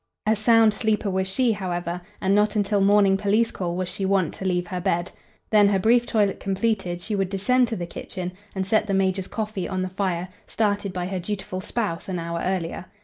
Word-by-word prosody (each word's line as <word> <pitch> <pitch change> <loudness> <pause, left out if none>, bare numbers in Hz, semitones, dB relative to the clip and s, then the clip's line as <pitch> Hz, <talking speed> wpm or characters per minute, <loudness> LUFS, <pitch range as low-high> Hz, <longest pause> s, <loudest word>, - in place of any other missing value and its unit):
A 215 +1 +3
sound 225 0 +5
sleeper 215 -2 0
was 190 0 0
she, 240 +5 +2
however, 180 -3 -3 0.2
and 190 +1 +2
not 210 +2 +3
until 205 -1 +1
morning 200 -1 +5
police 210 +3 +2
call 175 -2 -3
was 185 0 -2
she 195 - -5
wont 190 -4 +1
to 190 - -7
leave 180 -1 +1
her 180 0 -4
bed. 175 -2 0 0.4
Then, 210 -2 +6
her 200 -1 +3
brief 235 +5 +3
toilet 205 -4 +1
completed, 195 -3 -1
she 210 +4 -3
would 195 -2 0
descend 245 +6 +2
to 230 - -3
the 175 -4 -4
kitchen 180 +1 -6 0.2
and 190 -1 -1
set 215 +2 +2
the 195 - 0
major's 190 0 +1
coffee 215 -4 -3
on 185 -1 -1
the 185 - -3
fire, 185 -2 -2 0.2
started 205 -2 0
by 180 -1 -3
her 185 0 -3
dutiful 185 0 -4
spouse 205 -5 -3
an 185 - -2
hour 170 0 -3
earlier. 185 -1 -2
195 Hz, 210 wpm, -24 LUFS, 185-210 Hz, 0.4 s, Then